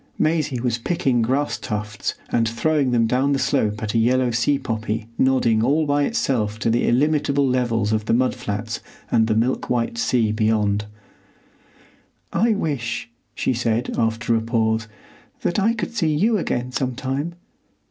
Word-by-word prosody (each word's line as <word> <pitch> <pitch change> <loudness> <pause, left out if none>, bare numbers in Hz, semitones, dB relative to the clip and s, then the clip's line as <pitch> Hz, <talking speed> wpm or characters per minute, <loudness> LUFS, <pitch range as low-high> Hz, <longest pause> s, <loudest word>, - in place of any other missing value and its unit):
Maisie 155 -5 +1
was 120 -1 -1
picking 130 -3 +1
grass 135 +6 0
tufts 105 -3 -4
and 115 -1 +1
throwing 140 +4 +1
them 120 -2 +3
down 130 +4 +1
the - - +2
slope 110 -6 0
at 105 - -2
a 115 - +3
yellow 125 +2 +2
sea 120 +5 +2
poppy 110 -4 -3
nodding 120 -4 +3
all 150 +6 +2
by 145 0 +2
itself 115 - 0
to 115 +1 0
the 120 - +1
illimitable 140 +1 +2
levels 115 -4 +1
of 110 -1 0
the - - +1
mud 130 +1 +2
flats 110 -2 -4 0.3
and 110 -1 +3
the 110 - +1
milk 120 +4 0
white 115 -1 -1
sea 115 -3 +2
beyond. 105 -1 +1 1.5
"I 225 0 +3
wish," 130 - -3 0.2
she - - 0
said, 120 0 -1
after 115 +1 0
a 115 - +1
pause, 110 -1 0 0.5
"that 175 - 0
I 225 +4 +2
could 235 - -4
see 165 -9 +1
you 215 +9 +2
again 125 -6 -2
sometime. 135 +5 -2
120 Hz, 160 wpm, -22 LUFS, 110-140 Hz, 1.5 s, them